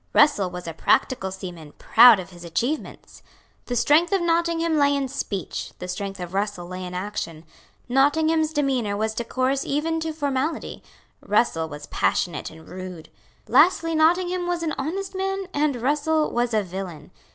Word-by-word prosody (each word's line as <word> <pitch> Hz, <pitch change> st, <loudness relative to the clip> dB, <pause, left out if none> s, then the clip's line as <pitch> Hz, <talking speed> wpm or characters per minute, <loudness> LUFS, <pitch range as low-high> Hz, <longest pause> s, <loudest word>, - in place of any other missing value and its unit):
Russell 250 Hz, -11 st, +4 dB
was 180 Hz, 0 st, -8 dB
a 165 Hz, -, -5 dB
practical 190 Hz, -, +1 dB
seaman, 175 Hz, -5 st, -9 dB
proud 235 Hz, -2 st, +7 dB
of 185 Hz, 0 st, -8 dB
his 175 Hz, -1 st, -12 dB
achievements. 235 Hz, -, -4 dB, 0.5 s
The 245 Hz, -, -2 dB
strength 300 Hz, -, +3 dB
of 390 Hz, -, +3 dB
Nottingham 335 Hz, -1 st, +1 dB
lay 285 Hz, 0 st, +4 dB
in 275 Hz, -1 st, -1 dB
speech; 205 Hz, -, -4 dB
the 180 Hz, -, -7 dB
strength 195 Hz, +2 st, -5 dB
of 180 Hz, 0 st, -6 dB
Russell 200 Hz, -2 st, -2 dB
lay 185 Hz, +1 st, -6 dB
in 180 Hz, 0 st, -6 dB
action. 180 Hz, -4 st, -5 dB, 0.4 s
Nottingham's 310 Hz, +4 st, +2 dB
demeanour 260 Hz, -9 st, 0 dB
was 220 Hz, +1 st, -1 dB
decorous 255 Hz, +4 st, -1 dB
even 320 Hz, +3 st, -1 dB
to 320 Hz, 0 st, -3 dB
formality; 290 Hz, 0 st, -2 dB, 0.4 s
Russell 165 Hz, -7 st, +1 dB
was 145 Hz, -1 st, -8 dB
passionate 175 Hz, -, -1 dB
and 160 Hz, 0 st, -15 dB
rude. 185 Hz, -3 st, -8 dB, 0.4 s
Lastly 330 Hz, -2 st, +4 dB
Nottingham 350 Hz, +3 st, +2 dB
was 350 Hz, -1 st, -1 dB
an 315 Hz, -2 st, -1 dB
honest 380 Hz, +8 st, -4 dB
man; 385 Hz, +1 st, -2 dB
and 290 Hz, -1 st, +1 dB
Russell 300 Hz, +5 st, +1 dB
was 240 Hz, 0 st, 0 dB
a 215 Hz, -, +2 dB
villain. 180 Hz, -5 st, -7 dB
255 Hz, 160 wpm, -24 LUFS, -, 0.5 s, proud